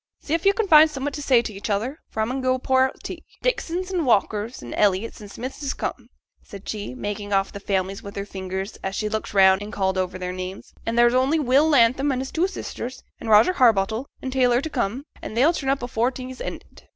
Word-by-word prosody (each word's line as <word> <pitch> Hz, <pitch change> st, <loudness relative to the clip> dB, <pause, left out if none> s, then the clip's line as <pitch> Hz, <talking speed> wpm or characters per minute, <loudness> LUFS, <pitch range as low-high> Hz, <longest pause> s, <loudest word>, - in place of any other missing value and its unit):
See 300 Hz, -, -4 dB
if 335 Hz, +3 st, +1 dB
yo' 395 Hz, -, +6 dB
can't 440 Hz, 0 st, -1 dB
find 315 Hz, -2 st, +8 dB
summut 285 Hz, -1 st, -4 dB
t' 295 Hz, -, -5 dB
say 255 Hz, -4 st, +4 dB
t' 220 Hz, -, -5 dB
each 200 Hz, +2 st, -6 dB
other, 225 Hz, +9 st, -1 dB
for 220 Hz, -, -3 dB
I -, -, +2 dB
mun 260 Hz, +3 st, -3 dB
go 255 Hz, 0 st, +2 dB
pour 260 Hz, 0 st, +3 dB
out -, -, -12 dB
tea. -, -, -7 dB, 0.2 s
Dixons, 370 Hz, -6 st, -1 dB
an' 350 Hz, -3 st, +1 dB
Walkers, 220 Hz, -, 0 dB
an' 120 Hz, -, -7 dB
Elliotts, 205 Hz, +2 st, +1 dB
an' 205 Hz, -, -10 dB
Smiths 255 Hz, +8 st, -7 dB
is 280 Hz, -1 st, -2 dB
come,' 240 Hz, -2 st, -5 dB, 0.3 s
said 200 Hz, -1 st, -12 dB
she, 215 Hz, +3 st, -5 dB
marking 205 Hz, -3 st, -5 dB
off 195 Hz, 0 st, +1 dB
the 200 Hz, -, -6 dB
families 195 Hz, -1 st, -2 dB
on 200 Hz, -, -9 dB
her 200 Hz, -, -3 dB
fingers, 190 Hz, +1 st, -5 dB
as 190 Hz, 0 st, -3 dB
she 215 Hz, -, -1 dB
looked 220 Hz, -1 st, -4 dB
round 190 Hz, 0 st, +6 dB
and 205 Hz, +1 st, -6 dB
called 190 Hz, -1 st, 0 dB
over 185 Hz, 0 st, -2 dB
their 180 Hz, 0 st, -4 dB
names; 185 Hz, +1 st, -7 dB
'an' 230 Hz, -, 0 dB
there's 240 Hz, 0 st, +5 dB
only 260 Hz, +5 st, +3 dB
Will 285 Hz, +2 st, +3 dB
Latham 270 Hz, +1 st, +4 dB
an' 260 Hz, -, -1 dB
his 265 Hz, +1 st, -4 dB
two 340 Hz, +3 st, +1 dB
sisters, 255 Hz, -9 st, -6 dB, 0.2 s
and 225 Hz, -, -6 dB
Roger 220 Hz, +11 st, +6 dB
Harbottle, 225 Hz, -, +2 dB, 0.2 s
an' 260 Hz, -, -3 dB
Taylor 250 Hz, -2 st, +3 dB
t' 315 Hz, +3 st, -5 dB
come; 240 Hz, 0 st, -1 dB, 0.2 s
an' -, -, -7 dB
they'll 280 Hz, +8 st, +4 dB
turn 275 Hz, -5 st, -3 dB
up 275 Hz, -1 st, 0 dB
afore 240 Hz, 0 st, +1 dB
tea's 260 Hz, 0 st, -8 dB
ended.' -, -, -8 dB
240 Hz, 240 wpm, -23 LUFS, 200-270 Hz, 0.3 s, find